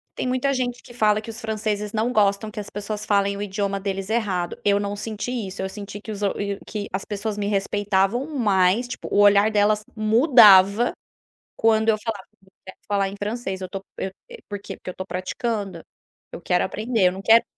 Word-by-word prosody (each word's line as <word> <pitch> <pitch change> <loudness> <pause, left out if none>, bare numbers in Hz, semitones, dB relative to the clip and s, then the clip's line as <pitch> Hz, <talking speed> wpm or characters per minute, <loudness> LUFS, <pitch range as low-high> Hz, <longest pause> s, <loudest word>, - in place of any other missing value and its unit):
Tem - - -2
muita 255 +2 +1
gente 245 -2 -2
que 240 - -13
fala 215 -3 +2
que 220 - -10
os 225 0 -7
franceses 215 -1 -3
não 225 +3 0
gostam, 205 -1 +2
que 210 - -7
as 205 - -6
pessoas 210 +1 -5
falem 200 -1 +1
o - - -5
idioma 200 0 -2
deles 195 0 -4
errado, 195 -7 -1
eu 200 0 +3
não 200 0 -2
senti 215 +3 -5 0.2
isso, 190 +1 -7
eu 190 - -2
senti 200 +1 -8
que 215 - -7
os 205 - -6 0.5
que 210 -2 -4
as 190 +1 -3
pessoas 210 0 -4
me 205 -1 -2
respeitavam 205 +4 0
mais 200 +1 +3
tipo - - -6
o - - +1
olhar 205 +1 +6
delas 210 0 +2
mudava, 215 - +6 0.7
quando 220 0 +3
eu 220 - +5
falava 215 -4 -4 0.6
falar 200 -1 +1
em 195 - -7
francês 205 -2 -4
eu 185 - -5
tô 195 +2 -5 0.2
eu 190 - -3 0.4
por 205 - -4
quê. - - -8
Porque - - -8
eu - - -6
estou 185 +1 -7
praticando, 195 -1 -3 0.5
eu - - -7
quero 180 +1 +1
aprender 215 0 +1
eu 180 - -2
não 190 +1 -8
quero 225 +2 +6
205 Hz, 200 wpm, -23 LUFS, 195-220 Hz, 0.7 s, olhar